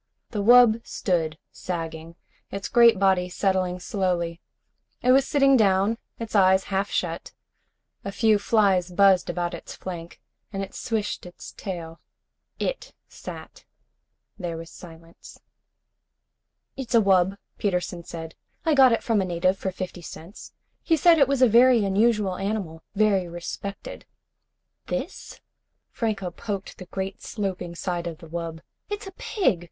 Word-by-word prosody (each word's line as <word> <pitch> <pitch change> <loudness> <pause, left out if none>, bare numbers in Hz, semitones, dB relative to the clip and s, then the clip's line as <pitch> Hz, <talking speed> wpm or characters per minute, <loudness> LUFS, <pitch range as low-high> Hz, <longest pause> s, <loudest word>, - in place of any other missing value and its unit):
The 210 - -2
wub 230 0 +6
stood 160 -5 -1
sagging, 165 -1 -6 0.3
its 195 0 -5
great 235 -4 +6
body 190 -2 +2
settling 185 -1 0
slowly. 175 -3 -2 0.6
It 250 - +5
was 270 +1 +5
sitting 275 -1 +4
down, 205 0 +3 0.2
its 230 -1 -7
eyes 190 -1 +5
half 195 +1 0
shut. 170 -1 -3 0.7
A 200 - -4
few 215 0 +3
flies 200 -4 +2
buzzed 190 0 +4
about 175 0 -2
its - - -8
flank, 170 -2 -8 0.3
and 195 -1 -3
it 195 - -8
switched 215 -5 -3
its 175 - -11
tail. 170 -4 -7 0.6
It - - -4
sat. - - -10 0.8
There 170 -3 -4
was 165 0 -9
silence. 165 -1 -14 1.4
"It's 255 -3 -3
a - - +8
wub," 195 -2 +3 0.2
Peterson 180 -3 -1
said. 165 -1 -8 0.3
"I 320 - +3
got 265 -3 +7
it 230 - +1
from 225 -4 +2
a - - +1
native 185 +2 0
for 190 - -2
fifty 185 -1 -6
cents. 170 +4 -10 0.3
He 325 - +2
said 335 +1 +6
it 275 - +6
was 275 -2 +2
a - - +8
very 240 -1 +5
unusual 205 -1 +2
animal. 195 -5 -3
Very 200 -3 +2
respected." 175 +3 -7 0.8
"This?" - - -5 0.5
Franco 205 -6 -2
poked 200 +2 -6
the 185 - -8
great 190 +1 -5
sloping 185 -5 -4
side 175 -1 -3
of 165 -2 -6
the 165 - -13
wub. 165 0 -5 0.3
"It's 415 0 -4
a 385 - -8
pig! 350 - 0
190 Hz, 145 wpm, -25 LUFS, 175-220 Hz, 1.4 s, a